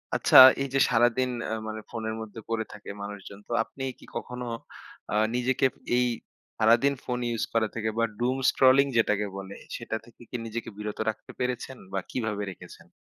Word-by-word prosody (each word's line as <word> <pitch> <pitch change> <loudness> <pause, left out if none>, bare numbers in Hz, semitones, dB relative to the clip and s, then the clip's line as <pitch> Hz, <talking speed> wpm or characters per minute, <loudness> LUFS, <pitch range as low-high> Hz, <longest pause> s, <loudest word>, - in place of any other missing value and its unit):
আচ্ছা - - +5 0.3
এই - - -2
যে, 135 - +3
সারাদিন 120 +2 +3 0.2
আ - - 0
মানে 110 0 -4
ফোনের 110 -1 -4
মধ্যে 110 0 -8
পড়ে 110 -1 -1
থাকে 105 - -11
মানুষজন 100 -1 -8
তো - - -11
আপনি 135 - -9 0.2
কি - - -14
কখনো 125 +1 -5 0.7
আ - - +1 0.2
নিজেকে 125 +2 +1 0.3
এই 125 - +3 0.5
সারাদিন 115 +5 +5
ফোন 125 -1 -2 0.2
use 115 - -1
করা 115 -1 +2
থেকে 110 -1 -1
বা 115 - +2 0.2
Doom 125 +2 +1
scrolling 135 +1 +5
যেটাকে 105 -2 +2
বলে 100 0 -7 0.2
সেটা 115 -1 -4
থেকে 120 - -19
কি - - -7
নিজেকে 115 +1 -5
বিরত 105 0 -5
রাখতে 110 - -6
পেরেছেন 125 +1 -3 0.2
বা 95 - +1
কিভাবে 110 -4 -2
রেখেছেন? 90 - -13
115 Hz, 175 wpm, -27 LUFS, 110-125 Hz, 0.7 s, আচ্ছা